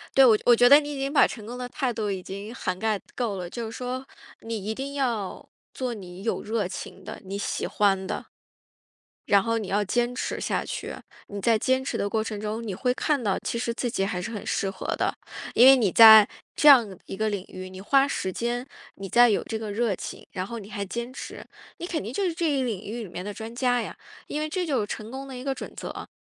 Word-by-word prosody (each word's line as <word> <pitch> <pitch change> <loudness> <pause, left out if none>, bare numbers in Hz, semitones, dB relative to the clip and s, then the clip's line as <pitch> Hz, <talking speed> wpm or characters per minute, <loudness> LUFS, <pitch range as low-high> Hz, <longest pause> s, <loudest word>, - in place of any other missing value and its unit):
对， 270 - +8
我 225 -4 +6
觉 - - -17
得 - - +6
我 240 - +8
觉 245 +1 +6
得 285 +1 +10
你 295 -1 -5
已 - - -5
经 275 +1 -1
把 295 - +6
成 215 -4 -8
功 245 +1 -6
的 250 0 -4
态 260 -3 -1
度 215 -2 -2
已 185 -2 -4
经 200 +4 -7
涵 185 -6 -2
盖 215 -2 0
够 230 -5 -1
了。 175 -1 -5
就 235 +3 -5
是 - - -9
说， 255 +1 -4 0.4
你 225 -3 -5
一 220 - -1
定 275 +3 -5
要， 235 -8 -2 0.2
做 255 -2 -3
你 185 -2 -9
有 230 - -1
热 215 -3 -1
情 - - -8
的、 - - -8
你 195 +1 -4
喜 - - -2
欢 195 -2 +1
的。 - - -4 1.0
然 200 -1 +5
后 230 0 0
你 210 -4 -4
要 205 +1 +2
坚 240 +4 0
持 - - -3
下 - - -1
去， - - -5 0.3
你 200 - -6
在 225 +2 +4
坚 260 +2 +2
持 - - -2
的 200 - -1
过 220 +1 0
程 210 -2 -5
中 215 +2 -3
你 200 -4 -4
会 250 +5 +1
看 285 -2 0
到 200 -2 +1
其 235 - -3
实 235 -1 -1
自 245 - -2
己 195 - -1
还 180 -2 -2
是 230 +5 -5
很 210 - -6
适 195 - 0
合 - - -8
的。 - - 0 0.4
因 245 - +8
为 270 - +9
你 220 -6 +2
在， 220 -2 +10 0.3
这 300 - +4
样 225 -9 +6
一 - - -6
个 220 0 +1
领 200 -2 -3
域， 185 0 -8
你 185 0 -10
花 275 +6 +4
时 190 -8 -2
间， 240 +1 -2 0.3
你 195 0 -7
再 240 0 +6
有 205 - +2
这 220 - -3
个 215 -2 -5
热 220 -2 0
情， - - -8
然 185 0 -3
后 235 -1 -6
你 205 0 -11
还 200 -1 -3
坚 235 +5 -5
持， - - -8 0.4
你 345 - -5
肯 330 - -2
定 220 - -5
就 400 - -1
是 345 - 0
这 330 -1 0
一 275 -2 +1
领 220 -6 -3
域 235 +3 -5
里 205 - -7
面 180 +1 -6
的 205 - -4
专 225 +2 -8
家 245 -1 +2
呀。 - - -6 0.3
因 300 - -3
为 310 - -2
这 365 +2 -1
就 270 -8 +1
是 - - -1
成 215 +1 -6
功 270 +1 -6
的 260 -2 -7
一 - - -7
个 270 -1 -1
准 - - -8
则， - - -7
230 Hz, 280 characters per minute, -26 LUFS, 205-255 Hz, 1.0 s, 得